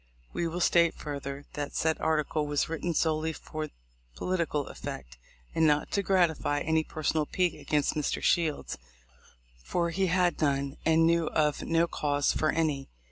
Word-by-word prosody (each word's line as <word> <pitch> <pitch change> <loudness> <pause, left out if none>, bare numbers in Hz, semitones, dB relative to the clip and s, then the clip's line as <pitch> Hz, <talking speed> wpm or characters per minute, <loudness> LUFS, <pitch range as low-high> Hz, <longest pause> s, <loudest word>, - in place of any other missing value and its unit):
We 170 - -1
will 170 +2 -3
state 170 -1 +4
further, 140 -1 -6
that 145 -1 -4
said 160 0 +1
article 155 -1 0
was 145 -1 0
written 165 +1 -2
solely 160 0 +1
for 155 0 -6 0.5
political 170 - -1
effect, 60 -1 -8 0.3
and 160 -1 +3
not 150 0 +2
to 200 - +1
gratify 170 -6 +2
any 160 +1 +2
personal 155 -1 -1
pique 180 -2 +1
against 150 -2 0
Mr. 150 -2 -1
Shields, 165 -4 0 0.8
for 170 - 0
he 190 +3 +1
had 180 -1 +2
none 140 -1 0
and 160 0 +5
knew 165 -1 +3
of 150 -2 +1
no 165 0 +2
cause 145 -4 0
for 155 - +1
any. 150 -4 0
155 Hz, 155 wpm, -29 LUFS, 145-170 Hz, 0.8 s, and